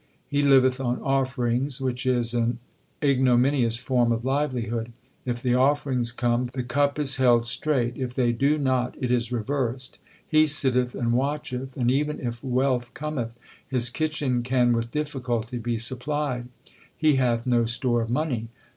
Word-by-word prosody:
He 145 0 0
liveth 135 -2 +4
on 125 -1 -1
offerings, 130 0 0
which 130 -1 -2
is 120 -2 +1
an 120 0 0 0.5
ignominious 130 -3 +3
form 120 -1 +1
of 115 +1 -1
livelihood. 120 -5 -1 0.3
If 120 -1 -3
the 125 -2 +2
offerings 130 -2 +2
come, 120 0 0
the 130 - -2
cup 140 +4 0
is 140 -2 0
held 120 -3 +4
straight; 120 -1 0
if 125 -2 -4
they 120 -2 +2
do 140 +6 +2
not 130 -3 0
it 125 -1 -1
is 120 -1 0
reversed. 125 +1 -3 0.3
He 155 0 +4
sitteth 125 -4 +2
and 120 -2 0
watcheth, 135 -1 -2
and 125 -1 +2
even 150 +3 0
if 120 -1 -5
wealth 125 -2 0
cometh, 135 -7 -4 0.3
his 125 -2 -1
kitchen 150 -5 -1
can 125 -1 +2
with 115 0 -1
difficulty 125 -4 -3
be 120 0 -2
supplied. 130 +1 -1 0.5
He 155 -3 +3
hath 120 -3 +1
no 120 -2 +2
store 120 0 0
of 115 - -3
money. 125 -4 -1
125 Hz, 155 wpm, -25 LUFS, 120-135 Hz, 0.5 s, liveth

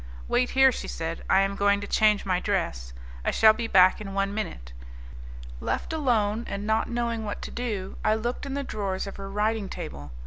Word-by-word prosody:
"Wait 250 - +2
here," 265 0 +7
she - - -5
said, 165 0 -4
"I 190 - +5
am 195 0 0
going 200 0 +3
to 205 - -5
change 210 -1 +3
my 185 -2 +1
dress. 170 - -2 0.3
I - - +1
shall 220 -1 +6
be 230 0 -3
back 185 0 +5
in 195 -2 -6
one 195 0 0
minute." - - -5 0.9
Left 320 - -3
alone, 230 -7 +1
and 200 +1 -4
not 220 +1 +1
knowing 235 -1 -2
what 205 -1 -5
to - - -6
do, 210 -6 -4
I 215 0 +3
looked 240 +5 -3
in 275 - -4
the 280 - -2
drawers 195 -6 -3
of 195 - -8
her 195 0 -7
writing 210 0 -1
table. 70 0 -7
205 Hz, 205 wpm, -26 LUFS, 195-225 Hz, 0.9 s, here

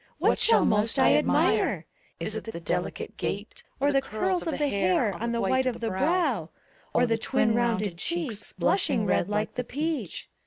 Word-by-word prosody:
What - - +2
shall 460 - +4
most 215 +1 +2
I - - +5
admire? - - +2 0.3
Is - - -1
't 225 - -5
the 170 - -7
delicate 165 - -3
gait, - - -4 0.2
Or 285 +1 +2
the 275 -1 +3
curls 350 - -1
of 325 - -1
the 295 - +1
hair 200 -1 +1
on 235 +6 -3
the 235 - -1
white 260 +6 +1
of 245 - -2
the 230 - -2
brow, 265 - 0 0.4
Or 245 - +3
the 225 -1 0
twin 225 -1 +1
rounded 220 -6 0
cheeks, 300 - -4
blushing 255 - +1
red 185 -1 +1
like 210 +1 -1
the 250 - -3
peach. 285 - -4
235 Hz, 185 wpm, -27 LUFS, 210-280 Hz, 0.4 s, I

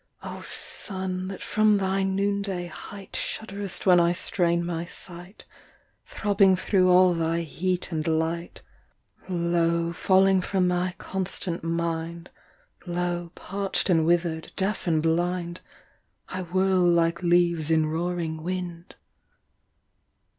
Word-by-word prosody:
O - - -7
sun, 185 -1 -2
that 195 0 -6
from 215 -1 +3
thy 195 0 0
noonday 195 -1 -1
height 195 +3 -10
Shudderest 200 -3 -3
when 180 -2 +6
I 170 0 +3
strain 170 -1 0
my 170 -1 -2
sight, 175 +2 -7 0.6
Throbbing 200 -2 +3
thro’ 185 0 +2
all 180 0 +6
thy 165 0 0
heat 180 +3 -2
and 155 -1 -2
light, 165 +1 -2 0.7
Lo, 170 -1 +1
falling 190 +1 +4
from 185 0 +1
my 180 0 0
constant 185 -2 -3
mind, 165 0 -3 0.6
Lo, 175 -1 -2
parch’d 195 0 -1
and 165 -2 +4
wither’d, 170 -2 0
deaf 195 0 -1
and 160 -2 +2
blind, 175 +1 -1 0.7
I 185 - -4
whirl 185 +1 +1
like 170 0 +3
leaves 170 -3 +2
in 160 -1 +3
roaring 165 0 -2
wind. 175 0 -5
175 Hz, 120 wpm, -26 LUFS, 170-190 Hz, 0.7 s, when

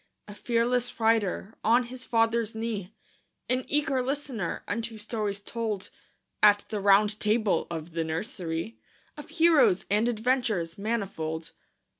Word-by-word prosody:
A 205 - -9
fearless 240 +2 0
rider 220 -2 +1
on 235 +3 +4
his 250 +1 -7
father's 225 -1 +1
knee, 220 -4 -3 0.6
An 255 +1 0
eager 280 -3 +1
listener 260 -7 -3
unto 225 +1 -3
stories 210 -2 -3
told 215 -2 -4 0.5
At 205 -1 +6
the 215 - -2
Round 205 +2 +4
Table 215 -1 +1
of 165 0 -5
the 165 0 -1
nursery, 165 +2 -4 0.4
Of 295 +1 -10
heroes 320 - +4
and 215 +4 +3
adventures 220 -8 0
manifold. 185 -7 -3
220 Hz, 125 wpm, -28 LUFS, 200-240 Hz, 0.6 s, At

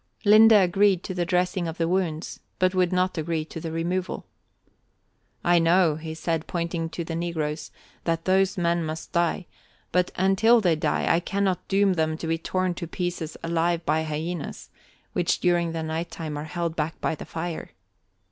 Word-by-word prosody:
Linde 215 +2 +8
agreed 195 -1 +4
to 185 - -4
the 175 -2 -1
dressing 180 -1 +1
of 165 - -5
the 165 - +1
wounds, 170 -3 -1 0.2
but 185 0 +2
would 185 -2 +2
not 185 -1 +1
agree 160 0 -2
to 165 - -8
the 165 - -4
removal. 175 +3 -2 1.2
"I 175 0 +4
know," 165 -2 +4
he 160 0 -6
said, 165 -1 -2
pointing 170 -1 -2
at 165 +1 -5
the 165 - -4
negroes, 160 -2 -3 0.4
"that 165 -1 -1
those 190 0 +2
men 170 -1 +1
must 155 0 -5
die, 175 +2 0 0.5
but 180 0 +2
until 195 +6 +4
they 180 -6 +3
die, 155 -1 0
I 165 - +4
cannot 195 +1 -1
doom 195 0 +3
them 160 -2 0
to 165 - -6
be 165 0 0
torn 185 +1 -1
to 170 - -3
pieces 175 -2 -4
alive 170 0 0
by 160 - +2
hyenas, 160 +1 -4 0.4
which 175 -1 +1
during 175 -2 +2
the 165 -1 -3
night 160 +2 -3
time 155 -3 -5
are 145 +1 -4
held 170 0 -3
back 155 0 -2
by - - 0
the 155 - -7
fire." 165 0 -5
170 Hz, 180 wpm, -25 LUFS, 160-185 Hz, 1.2 s, Linde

